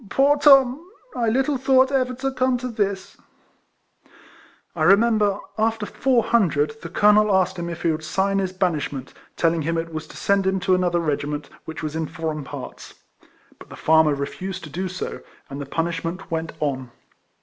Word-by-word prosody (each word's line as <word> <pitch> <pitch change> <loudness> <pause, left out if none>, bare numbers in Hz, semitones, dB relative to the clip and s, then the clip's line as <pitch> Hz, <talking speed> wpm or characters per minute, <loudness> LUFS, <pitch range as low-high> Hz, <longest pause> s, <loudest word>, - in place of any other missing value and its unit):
poor 280 +2 +4
Tom! 275 -1 +5 0.3
I 235 -2 +1
little 265 +3 +1
thought 265 0 +4
ever 255 -2 0
to 270 +2 -2
come 255 -1 +1
to 250 +1 -5
this! 200 -4 -3 0.7
" - - -27
I - - -5
re 195 - +7
member, 210 -2 +2 0.2
after 220 -1 0
four 250 +1 +1
hundred, 150 -9 +1
the 170 - -7
colonel 210 +3 +4
asked 185 -1 +1
him 170 0 -4
if 170 0 -7
he 170 - +3
would 155 0 -4
sign 195 +5 0
his 190 -1 -1
banishment, 155 -8 -2 0.2
telling 165 -1 +2
him 165 +2 -1
it 165 0 -4
was 155 0 -5
to - - -12
send 200 -1 +1
him 190 0 +1
to 185 0 +2
another 180 -1 +2
regiment, 150 -2 -3
which 160 0 -7
was 155 0 -4
in 160 -1 -2
foreign 155 -2 -4
parts; - - -9 0.6
but - - -14
the - - -10
farmer 160 -2 +3
refused 175 +7 -5
to 155 - -9
do 185 +5 -3
so, 185 0 -5 0.3
and 140 +1 -5
the 140 - -6
punish 165 +2 -2
ment 170 +2 -6
went 165 0 -3
on. 130 -4 -2
185 Hz, 190 wpm, -22 LUFS, 160-225 Hz, 0.7 s, re